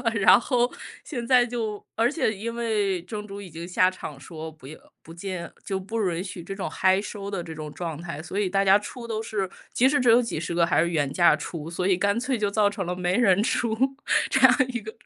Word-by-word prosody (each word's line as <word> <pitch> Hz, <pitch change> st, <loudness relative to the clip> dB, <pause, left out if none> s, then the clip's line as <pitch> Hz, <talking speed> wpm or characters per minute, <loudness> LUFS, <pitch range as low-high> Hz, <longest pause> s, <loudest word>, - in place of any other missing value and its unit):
然 200 Hz, -2 st, +6 dB
后 245 Hz, -1 st, +1 dB, 0.3 s
现 240 Hz, -6 st, -5 dB
在 250 Hz, -1 st, +5 dB
就， 225 Hz, -4 st, -4 dB
而 235 Hz, +4 st, +2 dB
且 290 Hz, -9 st, 0 dB
因 230 Hz, +4 st, -5 dB
为 210 Hz, -5 st, 0 dB
正 210 Hz, +3 st, -6 dB
主 200 Hz, 0 st, -8 dB
已 195 Hz, -4 st, -10 dB
经 165 Hz, +2 st, -7 dB
下 185 Hz, +1 st, +3 dB
场 150 Hz, -6 st, -8 dB
说 160 Hz, +2 st, -8 dB
不 155 Hz, -4 st, -18 dB
要 155 Hz, +4 st, -10 dB, 0.2 s
不 165 Hz, -, -12 dB
建 170 Hz, 0 st, -6 dB
就 195 Hz, -1 st, -2 dB
不 220 Hz, +4 st, -3 dB
允 170 Hz, +2 st, -3 dB
许 185 Hz, -2 st, -7 dB
这 195 Hz, +3 st, -6 dB
种 195 Hz, -, -3 dB
嗨 190 Hz, +1 st, +2 dB
收 200 Hz, -1 st, -6 dB
的 195 Hz, -4 st, -3 dB
这 165 Hz, -1 st, -8 dB
种 155 Hz, -1 st, -7 dB
状 165 Hz, -1 st, -5 dB
态。 170 Hz, -4 st, -6 dB
所 190 Hz, +4 st, -4 dB
以 200 Hz, -3 st, +1 dB
大 195 Hz, +1 st, +1 dB
家 195 Hz, +1 st, +6 dB
出 235 Hz, +3 st, -8 dB
都 220 Hz, -1 st, -2 dB
是， 205 Hz, -4 st, -2 dB, 0.2 s
即 255 Hz, -, +4 dB
使 290 Hz, +1 st, +2 dB
只 250 Hz, -2 st, +3 dB
有 230 Hz, -, +7 dB
几 230 Hz, -9 st, -2 dB
十 170 Hz, +1 st, -4 dB
个 170 Hz, -1 st, +4 dB
还 165 Hz, -, +2 dB
是 170 Hz, -, +1 dB
原 145 Hz, -5 st, 0 dB
价 175 Hz, -1 st, +5 dB
出， 160 Hz, -2 st, -6 dB
所 180 Hz, +2 st, -2 dB
以 190 Hz, -, +4 dB
干 200 Hz, +4 st, +1 dB
脆 255 Hz, +1 st, -1 dB
就 205 Hz, -1 st, +1 dB
造 210 Hz, 0 st, +3 dB
成 205 Hz, -1 st, -2 dB
了 180 Hz, +1 st, -3 dB
没 180 Hz, 0 st, 0 dB
人 200 Hz, -4 st, +4 dB
出， 230 Hz, -2 st, 0 dB, 0.5 s
这 265 Hz, -, +3 dB
样 260 Hz, -1 st, +8 dB
一 240 Hz, -2 st, -3 dB
个 220 Hz, +1 st, -7 dB
195 Hz, 265 characters per minute, -25 LUFS, 175-225 Hz, 0.5 s, 样